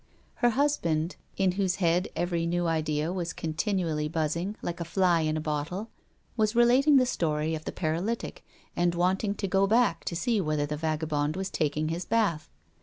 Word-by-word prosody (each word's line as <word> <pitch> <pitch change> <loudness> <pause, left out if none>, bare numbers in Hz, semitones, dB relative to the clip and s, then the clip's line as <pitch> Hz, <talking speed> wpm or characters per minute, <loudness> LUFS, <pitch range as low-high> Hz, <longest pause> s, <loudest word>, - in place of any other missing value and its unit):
Her 240 - +3
husband, 190 - 0 0.2
in 190 -1 +3
whose 185 -1 0
head 180 +1 +1
every 170 0 -1
new 175 +1 0
idea 155 0 0
was 175 -3 -3
continually 160 -2 -1
buzzing, 165 +5 -2
like 175 +1 -4
a - - -2
fly 175 0 +2
in 155 0 0
a - - -1
bottle, 155 +7 -3 0.4
was 215 -1 +1
relating 255 +5 +5
the 255 - +5
story 155 -8 -1
of 155 0 -5
the - - -3
paralytic, 175 +8 -3 0.3
and 175 0 +1
wanted 190 +4 +1
to 195 - -2
go 195 +1 +2
back 230 +2 +2
to 170 - -3
see 225 +3 +1
whether 155 -3 0
the 150 +1 -3
vagabond 155 -1 -1
was 190 0 -3
taking 155 +1 0
his 170 +2 -3
bath. 200 -9 0
175 Hz, 180 wpm, -28 LUFS, 155-195 Hz, 0.4 s, relating